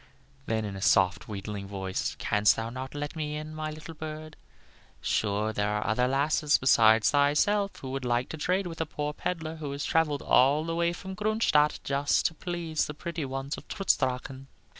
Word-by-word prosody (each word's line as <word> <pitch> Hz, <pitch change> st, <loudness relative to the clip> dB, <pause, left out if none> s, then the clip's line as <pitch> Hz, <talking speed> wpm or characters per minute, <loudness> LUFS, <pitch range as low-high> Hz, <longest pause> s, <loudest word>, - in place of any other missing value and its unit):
Then, 110 Hz, -1 st, 0 dB
in 100 Hz, -1 st, -5 dB
a 95 Hz, -, -7 dB
soft, 95 Hz, -2 st, +3 dB
wheedling 100 Hz, -1 st, -5 dB
voice, 95 Hz, -1 st, -3 dB
"Canst 105 Hz, 0 st, +3 dB
thou 115 Hz, +1 st, -4 dB
not 130 Hz, +3 st, -6 dB
let 145 Hz, +1 st, -4 dB
me 150 Hz, -1 st, -3 dB
in, 155 Hz, +1 st, -6 dB
my 155 Hz, 0 st, -4 dB
little 155 Hz, +1 st, -8 dB
bird? 155 Hz, 0 st, -7 dB, 0.6 s
Sure 105 Hz, +1 st, 0 dB
there 105 Hz, 0 st, 0 dB
are 105 Hz, 0 st, -1 dB
other 125 Hz, +4 st, +2 dB
lasses 145 Hz, +2 st, +2 dB
besides 110 Hz, -3 st, +5 dB
thyself 150 Hz, +8 st, +2 dB
who 130 Hz, -, -7 dB
would 135 Hz, -1 st, -3 dB
like 120 Hz, 0 st, 0 dB
to 160 Hz, -, -6 dB
trade 185 Hz, +5 st, 0 dB
with 165 Hz, -2 st, -5 dB
a 160 Hz, -, -1 dB
poor 150 Hz, -1 st, -3 dB
peddler 160 Hz, 0 st, -4 dB
who 150 Hz, -3 st, -5 dB
has 140 Hz, +1 st, -3 dB
travelled 160 Hz, -4 st, +1 dB
all 140 Hz, +5 st, +4 dB
the 165 Hz, -, -2 dB
way 170 Hz, 0 st, +1 dB
from 190 Hz, +2 st, -7 dB
Gruenstadt 205 Hz, -8 st, +2 dB
just 140 Hz, +1 st, +1 dB
to 160 Hz, -, +2 dB
please 170 Hz, -2 st, -2 dB
the 150 Hz, -, -7 dB
pretty 170 Hz, -1 st, -4 dB
ones 135 Hz, +2 st, -4 dB
of -, -, -12 dB
Trutz 195 Hz, -, +2 dB
Drachen." 130 Hz, +1 st, -3 dB
145 Hz, 195 wpm, -28 LUFS, 120-160 Hz, 0.6 s, besides